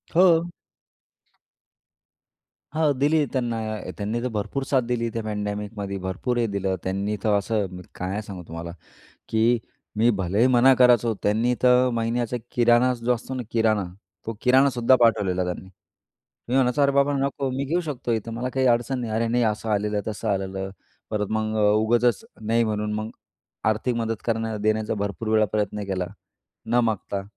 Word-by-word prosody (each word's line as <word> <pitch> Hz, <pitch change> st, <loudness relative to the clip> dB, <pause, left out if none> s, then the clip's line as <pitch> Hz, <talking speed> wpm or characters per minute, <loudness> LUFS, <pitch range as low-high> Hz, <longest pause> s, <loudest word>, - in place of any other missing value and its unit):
हो. 170 Hz, -1 st, +5 dB, 2.2 s
हां, 155 Hz, -1 st, +2 dB
दिली 150 Hz, +2 st, +3 dB
त्यांना 120 Hz, -3 st, -1 dB, 0.4 s
त्यांनी 105 Hz, +3 st, -2 dB
तर -, -, 0 dB
भरपूर 105 Hz, +6 st, -2 dB
साथ 135 Hz, -2 st, +3 dB
दिली 115 Hz, -1 st, -1 dB
त्या 115 Hz, -, -2 dB
पँडॅमिकमध्ये, 105 Hz, -1 st, -4 dB
भरपूर 95 Hz, +7 st, -3 dB
हे 120 Hz, -, +2 dB
दिलं 100 Hz, -2 st, -1 dB
त्यांनी, 100 Hz, +3 st, -1 dB
तर 110 Hz, -, +1 dB
असं 105 Hz, 0 st, 0 dB
मी 90 Hz, -, -8 dB
काय 95 Hz, +3 st, -3 dB
सांगू 95 Hz, -4 st, -8 dB
तुम्हाला, 85 Hz, +1 st, -6 dB, 0.6 s
की 115 Hz, +2 st, +3 dB, 0.4 s
मी 115 Hz, +3 st, +4 dB
भलेही 100 Hz, +6 st, +2 dB
मना 130 Hz, +1 st, +6 dB
करायचो, 120 Hz, -2 st, +4 dB
त्यांनी 115 Hz, +4 st, +2 dB
तर 125 Hz, 0 st, +5 dB
महिन्याचा 115 Hz, +1 st, -1 dB, 0.2 s
किराणा 120 Hz, +1 st, +4 dB
जो 120 Hz, +1 st, 0 dB
असतो 125 Hz, +3 st, -7 dB
ना, 130 Hz, -, -3 dB
किराणा 110 Hz, -3 st, +2 dB, 0.4 s
तो 115 Hz, -, -3 dB
किराणासुद्धा 130 Hz, -1 st, +4 dB
पाठवलेला 100 Hz, -6 st, +3 dB
त्यांनी. 90 Hz, +1 st, -5 dB, 0.8 s
मी 125 Hz, -, -1 dB
म्हणायचो 130 Hz, +2 st, +3 dB
अरे 140 Hz, 0 st, +4 dB
बाबा 140 Hz, +1 st, +3 dB
नको 135 Hz, 0 st, -1 dB
मी 135 Hz, +2 st, -2 dB
घेऊ 165 Hz, +6 st, 0 dB
शकतो 140 Hz, -7 st, -3 dB
इथं, 115 Hz, +1 st, -2 dB
मला 120 Hz, +2 st, -2 dB
काही 130 Hz, -1 st, +2 dB
अडचण 120 Hz, +2 st, +2 dB
नाही. 115 Hz, -3 st, -4 dB
अरे 115 Hz, +1 st, 0 dB
नाही 120 Hz, +1 st, +1 dB
असं 110 Hz, 0 st, -1 dB
आलेलं 105 Hz, 0 st, 0 dB
आहे, 105 Hz, +1 st, -2 dB
तसं 110 Hz, +1 st, -4 dB
आलेलं, 95 Hz, -1 st, -2 dB, 0.4 s
परत 105 Hz, -1 st, -1 dB
मग 110 Hz, 0 st, -1 dB, 0.2 s
उगाचच 120 Hz, -, +2 dB, 0.2 s
नाही 115 Hz, +2 st, +1 dB
म्हणून 105 Hz, -1 st, -2 dB
मग 110 Hz, +1 st, -3 dB, 0.6 s
आर्थिक 110 Hz, +3 st, 0 dB
मदत 115 Hz, -2 st, -2 dB
करणं 115 Hz, -1 st, -1 dB
देण्याचा 110 Hz, 0 st, +1 dB
भरपूर 100 Hz, +1 st, -3 dB
वेळा 110 Hz, 0 st, +4 dB
प्रयत्न 105 Hz, 0 st, -1 dB
केला, 95 Hz, -2 st, -1 dB, 0.6 s
न 120 Hz, +2 st, +3 dB
मागता. 100 Hz, -3 st, -2 dB
115 Hz, 160 wpm, -24 LUFS, 105-125 Hz, 2.2 s, मना